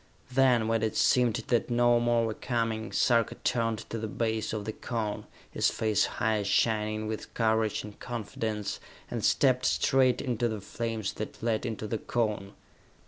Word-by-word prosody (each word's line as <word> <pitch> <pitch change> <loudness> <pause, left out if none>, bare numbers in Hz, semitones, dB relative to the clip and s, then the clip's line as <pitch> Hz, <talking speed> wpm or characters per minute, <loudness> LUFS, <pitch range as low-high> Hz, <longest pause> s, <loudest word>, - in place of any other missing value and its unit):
Then, 125 -4 +4
when 115 -1 +1
it 110 -1 -1
seemed 125 -4 +4
that 120 0 +2
no 120 0 +4
more 120 -1 +2
were 110 - -2
coming, 115 -2 -2
Sarka 115 -3 +2
turned 115 -2 0
to 115 - -3
the 110 - -3
base 110 0 -1
of 105 -2 -3
the 110 - -2
Cone, 110 -3 -4 0.2
his - - +2
face 110 -2 +1
high 110 -1 +1
shining 110 +1 +1
with 110 0 -5
courage 110 -2 +1
and 105 -1 -10
confidence, 110 -3 -4 0.3
and - - -3
stepped 130 -2 +3
straight 130 -2 +3
into 120 -3 0
the 110 -2 -3
flames 110 0 -3
that 105 - -7
led 115 +1 0
into 110 -1 -4
the 110 +1 -2
Cone. 105 -4 -2
115 Hz, 165 wpm, -29 LUFS, 110-120 Hz, 0.3 s, Then